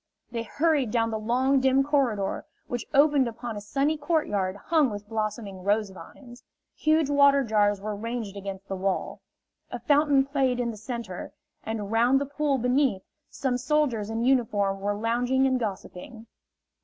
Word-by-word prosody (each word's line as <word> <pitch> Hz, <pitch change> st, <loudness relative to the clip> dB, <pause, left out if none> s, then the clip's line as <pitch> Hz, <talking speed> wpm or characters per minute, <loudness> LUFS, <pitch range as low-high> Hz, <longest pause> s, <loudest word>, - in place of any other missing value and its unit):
They 230 Hz, -1 st, -3 dB
hurried 290 Hz, 0 st, +1 dB
down 230 Hz, 0 st, 0 dB
the 220 Hz, -, -2 dB
long, 255 Hz, +5 st, +2 dB
dim 265 Hz, +1 st, +3 dB
corridor, 260 Hz, -9 st, 0 dB, 0.2 s
which 245 Hz, -1 st, -5 dB
opened 285 Hz, -2 st, +4 dB
upon 235 Hz, 0 st, -6 dB
a 205 Hz, -, -6 dB
sunny 275 Hz, +9 st, 0 dB
courtyard 245 Hz, -, -1 dB
hung 305 Hz, +6 st, +1 dB
with 205 Hz, -1 st, -7 dB
blossoming 215 Hz, -3 st, -4 dB
rose 205 Hz, 0 st, +1 dB
vines. 240 Hz, +5 st, -13 dB, 0.3 s
Huge 310 Hz, -1 st, +2 dB
water 280 Hz, -1 st, +5 dB
jars 205 Hz, -3 st, +2 dB
were 210 Hz, +1 st, -4 dB
ranged 225 Hz, -1 st, -5 dB
against 195 Hz, -1 st, -7 dB
the 195 Hz, -, -3 dB
wall. 190 Hz, 0 st, -2 dB, 0.5 s
A -, -, -5 dB
fountain 290 Hz, -2 st, +3 dB
played 270 Hz, -3 st, 0 dB
in 235 Hz, -1 st, -1 dB
the -, -, -9 dB
center, 225 Hz, -4 st, -6 dB, 0.3 s
and 215 Hz, -2 st, -4 dB
round 240 Hz, +4 st, +4 dB
the 285 Hz, -, -2 dB
pool 285 Hz, 0 st, -1 dB
beneath, 250 Hz, -4 st, +1 dB, 0.3 s
some 250 Hz, -2 st, -2 dB
soldiers 260 Hz, -6 st, 0 dB
in 225 Hz, +1 st, -2 dB
uniform 210 Hz, -6 st, +1 dB
were 205 Hz, +1 st, -1 dB
lounging 245 Hz, +4 st, +1 dB
and 260 Hz, -1 st, +2 dB
gossiping. 220 Hz, +1 st, -6 dB
235 Hz, 160 wpm, -26 LUFS, 210-275 Hz, 0.5 s, water